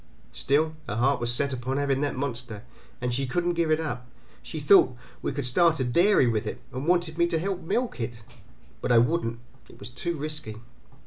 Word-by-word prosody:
Still, 155 +3 +1
her 105 - -3
heart 130 +3 +2
was 120 0 0
set 140 +3 0
upon 130 +2 -2
having 140 -1 +1
that 145 -1 -1
monster, 125 -5 -4 0.4
and 125 -1 -1
she 135 +2 -1
couldn't 175 +6 0
give 170 -1 0
it 155 0 +3
up. 125 -6 -4 0.3
She 155 - -6
thought 145 -4 +5 0.2
we - - -1
could 140 -1 -3
start 160 +6 +3
a - - +2
dairy 170 +6 +4
with 115 -3 0
it, - - -4
and 130 +4 -4
wanted 175 -2 +1
me 170 - +4
to 165 - 0
help 185 +2 -2
milk 235 - -1
it; 115 0 -5 0.6
but - - -1
I 120 - +6
wouldn't; 115 -1 +2 0.3
it - - -15
was 105 +4 -9
too 170 +7 -3
risky. 150 -6 -4
140 Hz, 205 wpm, -27 LUFS, 125-160 Hz, 0.6 s, I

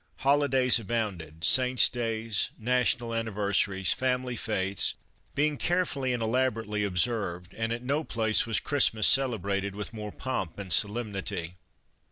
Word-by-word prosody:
Holidays 135 -3 +3
abounded, 95 -8 -4
Saints' 125 -1 +5
Days, 115 -3 -1
National 120 0 0
An 115 0 -1
niversaries, 100 -2 +1
Family 125 -1 -1
Fetes 100 -3 0 0.4
being 150 0 +1
carefully 165 -7 0
and 120 -2 -2
elab 130 +3 +1
orately 105 -1 -3
observed, 90 -2 -1
and 115 0 -3
at 120 +1 -4
no 140 +5 -1
place 110 -4 0
was 115 - +2
Christmas 115 -7 +2
celebrated 100 -7 +2
with 105 +2 -5
more 105 -1 -6
pomp 115 -11 -4
and 95 -4 0
solemnity. 100 -5 -1
115 Hz, 135 wpm, -28 LUFS, 100-125 Hz, 0.4 s, Saints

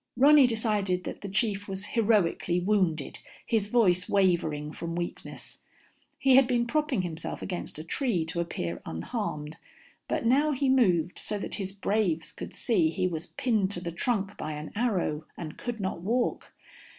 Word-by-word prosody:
Ronny 285 0 +7
decided 210 -6 0
that - - -6
the 200 - -5
chief 200 0 0
was 195 0 -4
heroically 205 -6 +2
wounded, 180 -6 0 0.3
his 215 -3 +1
voice 185 -6 +3
wavering 165 -6 +1
from 165 +2 -5
weakness. 175 0 -6 0.6
He 270 -2 +5
had 265 -2 +6
been 240 -2 +2
propping 290 -5 0
himself 165 -3 -5
against 180 -5 -5
a 155 - -6
tree 185 - 0
to 160 +1 -3
appear 85 - -3
unharmed, 150 - -4 0.5
but - - -1
now 285 +6 +4
he 270 0 +1
moved 185 -10 +3
so 210 - -3
that 200 - -5
his 190 0 -3
braves 195 -4 0
could - - -8
see 185 -10 +2
he 185 +3 -1
was 165 -2 -4
pinned 215 -7 0
to 175 - -1
the 175 -1 -4
trunk 200 +2 -1
by 155 - -4
an 150 +1 -6
arrow 185 -9 0
and 155 -3 -7
could 240 -2 -4
not 190 -3 -3
walk. 235 +6 -1
195 Hz, 165 wpm, -28 LUFS, 170-230 Hz, 0.6 s, Ronny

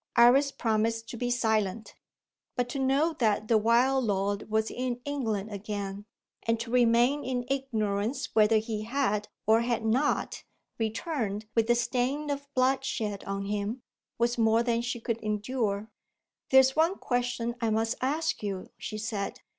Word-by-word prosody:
Iris 255 +4 +6
promised 225 -1 0
to - - -6
be 245 +1 -2
silent. 220 -3 0 0.6
But 245 0 -1
to 275 - -3
know 275 +5 +2
that 215 -3 +1
the 225 - +4
wild 245 +4 +3
lord 200 0 -1
was 220 0 0
in 250 -1 -3
England 220 -8 -2
again, 200 0 -5 0.4
and 230 0 0
to 230 0 -5
remain 245 +3 +3
in 250 -1 -2
ignorance 230 -2 -1
whether 220 0 +5
he 215 -1 -2
had, 215 -3 -1 0.2
or 220 +2 +5
had 235 -2 -1
not, 255 +7 0 0.4
returned 220 -2 -2
with 225 0 +2
the 240 - +4
stain 260 +5 0
of 280 0 -5
bloodshed 255 -5 0
on 195 0 -3
him, 210 +4 -3 0.3
was 240 +1 +1
more 225 +1 +4
than 235 -1 +1
she 240 0 -3
could 230 0 -2
endure. 215 -1 -2 0.6
"There 265 0 +8
is 265 0 +1
one 325 +4 +3
question 245 -1 -1
I 230 - +1
must 225 +1 +1
ask 305 +5 0
you," 195 -3 -4
she 215 - -5
said. 210 -2 -4
230 Hz, 155 wpm, -28 LUFS, 215-255 Hz, 0.6 s, There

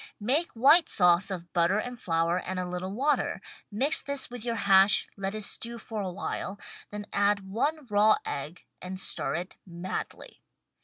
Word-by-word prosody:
Make 275 +11 +1
white 280 +9 +5
sauce 180 +1 +4
of 175 -3 -6
butter 175 +3 +2
and 245 +2 -5
flour 165 +1 +1
and 185 0 -4
a 180 - -2
little 180 +1 -4
water, 275 +8 0 0.3
mix 270 +9 +3
this 280 -3 -1
with 245 -3 -5
your 235 -1 -2
hash, 195 -1 +5
let 195 +1 -3
it 215 - -3
stew 235 +3 -2
for 220 -2 -5
a 190 -2 -3
while, 195 +1 -5 0.3
then 205 0 -6
add 200 -1 +1
one 290 +9 -1
raw 210 0 +4
egg 150 +5 -6 0.2
and 185 +1 -6
stir - - -1
it 180 +2 -5
madly. 175 +1 -7
200 Hz, 170 wpm, -28 LUFS, 180-235 Hz, 0.3 s, white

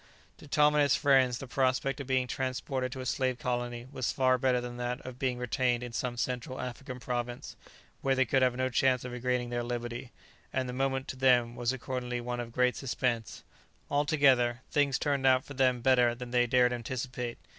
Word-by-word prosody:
To - - -13
Tom 150 +1 +4
and 150 - +4
his 140 -2 +4
friends 130 -3 +3
the 135 - -7
prospect 130 +1 0
of 140 - -6
being 130 -1 +2
transported 130 0 -3
to 130 0 -6
a - - -6
slave 130 -1 0
colony 120 -1 -3
was 130 -3 -1
far 130 -1 +2
better 125 -1 +2
than 120 0 -6
that 125 +1 -2
of 130 -1 -8
being 130 -2 0
retained 125 0 0
in 120 -1 -7
some 120 0 -3
Central 125 +1 -3
African 125 +1 -6
province, 120 -1 -4 0.5
where 135 -1 +2
they 130 0 +3
could 130 +3 +2
have 125 -1 +3
no 130 +1 0
chance 130 0 +2
of 125 - -5
regaining 125 0 -1
their 120 0 -1
liberty; 120 0 -5 0.4
and 130 -1 -1
the 125 - -5
moment, 135 0 -1
to - - -4
them, 125 -2 +3
was 120 0 0
accordingly 125 -1 -3
one 120 0 -4
of 120 -1 -5
great 125 0 +2
suspense. 120 -2 -2 0.5
Altogether, 135 -5 +3
things 140 -2 +2
turned 140 -2 +1
out 130 0 +4
for 145 - -9
them 130 -2 +2
better 125 -1 +4
than 125 0 -8
they 125 -1 +3
dared 125 0 +4
anticipate. 125 0 -4
125 Hz, 200 wpm, -30 LUFS, 120-130 Hz, 0.5 s, Tom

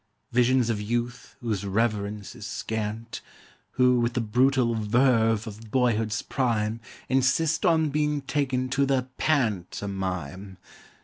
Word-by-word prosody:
Visions 125 0 +3
of 105 -2 -2
youth 120 +3 -3
whose 110 -5 -2
reverence 105 0 -1
is - - -8
scant, 110 +1 -4 0.5
Who 125 -1 +4
with 120 0 0
the - - +1
brutal 120 +2 +2
verve 115 0 +2
of 110 0 -9
boyhood's 115 -3 +1
prime 115 -4 -1 0.3
Insist 135 +8 +2
on 160 -2 +3
being 150 0 0
taken 130 -3 -1
to 140 +1 +1
the 130 -1 0
pant 110 - +1
omime. 95 -1 -4
120 Hz, 125 wpm, -26 LUFS, 105-130 Hz, 0.5 s, Who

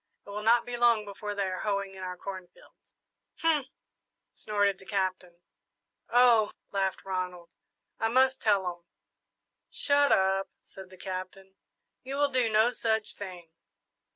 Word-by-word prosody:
It 200 - -10
will 210 +1 -4
not 230 +2 +4
be 245 - -4
long 235 -3 +4
before 205 +1 -6
they 200 - 0
are 185 -1 -3
hoeing 200 -2 -2
in 190 - -10
our 180 -1 -5
corn 185 -1 -7
fields.'" 175 - -24 0.4
"Humph!" 310 -5 +2 0.7
snorted 205 -2 0
the 190 - -15
Captain. 185 -3 -2 0.7
"Oh!" 235 -3 +5 0.2
laughed 195 -1 -1
Ronald, 180 -2 -4 0.5
"I 225 - +1
must 260 +3 +3
tell 200 -3 +2
'em!" 175 -1 -5 0.9
"Shut 285 0 +3
up," 190 0 +2
said 190 -1 -13
the 185 - -15
Captain; 190 +1 -7 0.5
"you 265 +2 -5
will 285 0 +2
do 250 -3 +2
no 220 +2 +4
such 220 -3 -1
thing!" 180 -4 -9
200 Hz, 150 wpm, -29 LUFS, 185-230 Hz, 0.9 s, Oh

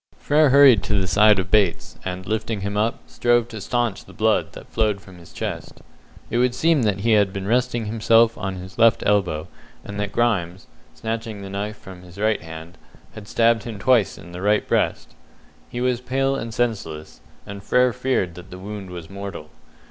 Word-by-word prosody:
Frere 150 0 +3
hurried 135 -6 +7
to 105 -2 +1
the 95 - 0
side 105 +3 +5
of 95 -1 -3
Bates, 100 -5 +1
and 95 0 -5
lifting 110 0 -2
him 100 +1 -3
up, 110 +3 0
strove 120 -1 +1
to 110 -3 -7
staunch 120 -1 -1
the - - -15
blood - - +1
that - - -11
flowed 110 -3 0
from 95 -2 -15
his 85 - -15
chest. - - -6 0.5
It 120 - +1
would 125 0 +2
seem 160 -1 +3
that 105 -4 0
he 115 +2 +1
had 105 -3 +4
been 95 -1 -5
resting 120 0 +1
himself 115 +1 +3
on 95 0 -4
his 95 +4 -10
left 115 -1 +5
elbow, 90 -6 +1 0.4
and 100 0 -6
that 105 -1 -2
Grimes, 95 -6 0 0.3
snatching 110 -2 -5
the 95 - -8
knife 105 +2 -4
from 95 -2 -12
his 90 +1 -15
right 110 +1 +1
hand, 80 +1 -10 0.3
had 105 -2 -10
stabbed 115 0 +3
him 115 -3 -7
twice 115 0 +2
in 85 - -12
the 90 +1 -7
right 105 +1 +2
breast. - - 0 0.6
He 120 - -5
was 125 -1 0
pale 135 +2 0
and 115 -4 -4
senseless, 105 -10 -3 0.2
and 100 0 -8
Frere 125 +4 +2
feared 125 -8 -1
that 90 +2 -12
the 90 - -9
wound 100 0 -7
was 85 -2 -8
mortal. 100 -5 -8
105 Hz, 195 wpm, -22 LUFS, 95-115 Hz, 0.6 s, hurried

